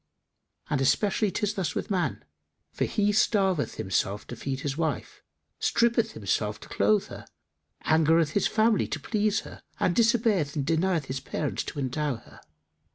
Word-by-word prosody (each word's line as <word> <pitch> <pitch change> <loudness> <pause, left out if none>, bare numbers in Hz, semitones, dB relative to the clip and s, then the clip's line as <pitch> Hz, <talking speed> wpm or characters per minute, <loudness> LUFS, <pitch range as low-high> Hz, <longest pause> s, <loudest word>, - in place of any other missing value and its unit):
And 145 -3 0
especially 205 - +2
'tis 210 +2 -1
thus 185 -7 -2
with - - -3
man; 185 -3 -1 0.5
for - - -1
he 210 -1 +1
starveth 195 -6 +2
himself 100 0 -1
to 120 - -7
feed 135 +3 -4
his 140 -2 -2
wife, 160 0 -3 0.4
strippeth 230 -1 +2
himself 105 0 -1
to - - -12
clothe 105 +1 +2
her, - - -10 0.6
angereth 160 0 +3
his 200 - +2
family 220 -1 +2
to - - -3
please 215 -2 0
her - - -12 0.2
and 175 - +1
disobeyeth 220 - +2
and 140 -3 -1
denieth 165 0 +1
his 130 0 -4
parents 145 +2 -3
to - - -7
endow 140 +1 -1
her. 115 - -15
160 Hz, 160 wpm, -27 LUFS, 135-205 Hz, 0.6 s, angereth